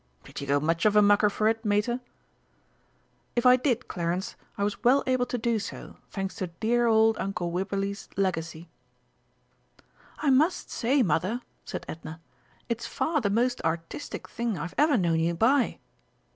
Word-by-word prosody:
"Did - - -9
you 140 - -6
go 140 +1 +3
much 165 +6 +1
of 210 - +2
a 210 - +7
mucker 205 +1 +5
for 215 +1 0
it, 225 +1 +1
Mater?" 210 +3 +1 1.4
"If 240 +1 0
I 250 0 +8
did, 250 -2 0
Clarence, 175 +1 -3 0.2
I 200 - -1
was 205 +2 -2
well 255 +3 +5
able 255 -1 +1
to 245 - -2
do 230 -1 0
so, - - -8
thanks 195 -1 -4
to 185 - -2
dear 230 +7 +1
old 220 -1 +4
Uncle 180 -3 -2
Wibberley's 195 +2 -3
legacy." 170 -3 -2 1.5
"I 290 - +1
must 310 +7 +2
say, 260 +3 +2
Mother," 185 +7 0 0.2
said - - -6
Edna, 160 0 -8 0.5
"it's 235 -1 -3
far 310 -2 0
the 205 - 0
most 245 +4 +1
artistic 165 - -4
thing 235 -4 -3
I've 165 +3 -5
ever 295 -3 +4
known 170 -4 +2
you 170 +1 +1
buy." 250 +8 +2
210 Hz, 165 wpm, -27 LUFS, 175-240 Hz, 1.5 s, I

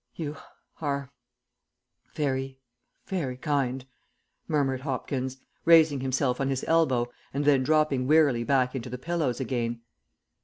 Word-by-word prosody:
"You 150 -2 -4 0.5
are 140 -3 -2 1.0
very 135 -2 -2 0.5
very 145 -10 -3
kind," 135 -2 -1 0.6
murmured 135 -4 0
Hopkins, 130 -1 -3 0.3
raising 160 -4 +6
himself 130 0 0
on 135 - 0
his 135 -1 -2
elbow 130 -8 +2 0.2
and 145 +1 0
then 140 -2 +5
dropping 145 -2 +2
wearily 145 -6 +4
back 130 0 +2
into 125 -2 -5
the 125 - -5
pillows 155 -3 -1
again. 120 -2 -2
135 Hz, 120 wpm, -27 LUFS, 130-150 Hz, 1.0 s, raising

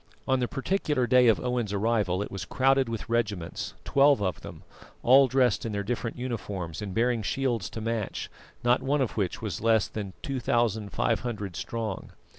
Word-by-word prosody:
On 130 0 +2
the 125 - 0
particular 145 -2 0
day 125 0 +5
of 110 - +4
Owen's 125 -4 -1
arrival 100 -3 +1
it - - -8
was 100 - -5
crowded 135 -1 +2
with 115 -2 -4
regiments, 105 -7 -2
twelve 140 0 +4
of 95 -3 -2
them, - - -10 0.4
all 135 +2 +7
dressed 125 -4 +2
in 115 - -3
their 100 0 -1
different 115 +2 -3
uniforms 105 -9 -4
and 105 -2 -4
bearing 115 +3 +1
shields 120 -1 -1
to 115 - -6
match, 115 -2 -3 0.4
not 120 +1 +3
one 140 +2 +1
of 130 - 0
which 100 0 -2
was 100 -7 -3
less 110 -1 +3
than 100 -3 -6
2500 115 - -1
strong. 110 -1 -4
115 Hz, 170 wpm, -27 LUFS, 105-125 Hz, 0.4 s, all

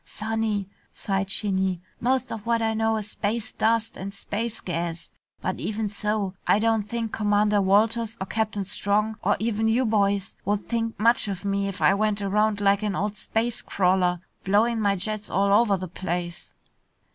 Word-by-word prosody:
"Sonny," 215 -2 -2 0.2
sighed 195 -1 -2
Shinny, 190 -3 0 0.2
"most 255 +1 0
of 225 0 -6
what 235 0 +3
I 225 -1 +1
know 220 0 +1
is 210 -1 -5
space 220 +2 -2
dust 225 0 +1
and 195 +1 -5
space 225 +3 -3
gas. 170 -1 -4 0.3
But - - -2
even 215 0 -2
so, 210 -1 -1
I - - +5
don't 220 -1 +1
think 230 -1 -2
Commander 210 -1 +2
Walters 220 +4 +2
or 190 - -2
Captain 215 -1 -1
Strong, 210 +2 0
or - - +2
even 220 0 0
you 240 +3 +2
boys, 200 -3 +1
would 205 +1 -1
think 230 -2 -2
much 230 +1 +3
of 195 -1 -4
me 200 0 0
if 195 - -4
I - - +6
went 210 0 +1
around 205 +1 +1
like 200 0 +3
an 210 -2 -1
old 205 +2 -1
space 225 +3 -1
crawler, 180 -2 +1 0.2
blowin' 220 +4 +2
my 200 -1 +2
jets 210 +2 -3
all 200 +1 +2
over 205 -2 +4
the 185 0 -5
place." 175 -1 -5
210 Hz, 175 wpm, -25 LUFS, 195-225 Hz, 0.3 s, I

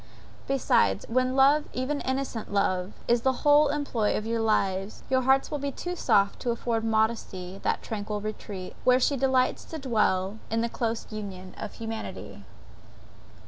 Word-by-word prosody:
Besides, 100 - +2
when 255 +2 +1
love, 280 +3 +5
even 275 +3 -2
innocent 260 -5 -3
love, 185 -2 0
is 235 0 +3
the 260 +3 0
whole 295 +1 +6
employ 280 -7 0
of 215 - -4
your 230 0 -1
lives, 195 -2 0
your 260 0 +4
hearts 265 +1 +3
will 295 - -2
be 280 0 -2
too 355 +5 -5
soft 200 - +2
to 245 - -3
afford 230 -1 -1
modesty 220 -4 -1
that - - -1
tranquil 210 -1 -4
retreat, 205 -3 -6
where 250 0 +5
she 280 +2 +2
delights 260 -1 +2
to 320 - -7
dwell, 215 -6 0
in 225 +1 0
close 230 -1 -2
union 195 -3 -7
with - - -5
humanity. 225 -1 -6
230 Hz, 155 wpm, -27 LUFS, 205-265 Hz, -, whole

